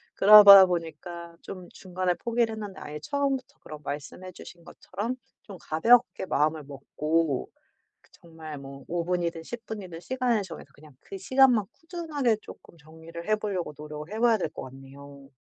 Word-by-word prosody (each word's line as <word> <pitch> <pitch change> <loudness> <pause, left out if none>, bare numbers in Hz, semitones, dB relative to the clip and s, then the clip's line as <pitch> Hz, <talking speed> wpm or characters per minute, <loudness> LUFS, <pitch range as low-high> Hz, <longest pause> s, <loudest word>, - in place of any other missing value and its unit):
그러다 200 -1 +10
보니까 170 0 -6
좀 185 -2 -9
중간에 185 -1 -2
포기를 235 +1 -1
했는데 210 -3 -8
아예 150 0 -7
처음부터 275 - -2
그런 155 - -10
말씀해 150 +6 -7
주신 170 0 -13
것처럼 210 +9 -6 0.3
좀 200 -3 -11
가볍게 230 +6 +2
마음을 155 -2 0
먹고 145 +1 -2 0.5
그 - - -28
정말 160 -3 -11
뭐 135 0 -11
5 170 0 -3
분이든 170 -2 -2
10 235 +7 -8
분이든 190 -6 -7
시간을 250 +1 -1
정해서 175 -6 -10
그냥 150 -1 -18
그 195 - -9
시간만 250 0 +4
꾸준하게 315 -9 -2
쪼끔 170 - -15
정리를 160 +2 -12
해 215 - +4
보려고 195 -7 -4
노력을 150 +2 -9
해 215 - -5
봐야 230 -1 +4
될 160 - -2
것 - - -9
같네요. 135 +1 -13
175 Hz, 340 characters per minute, -26 LUFS, 155-215 Hz, 0.5 s, 그러다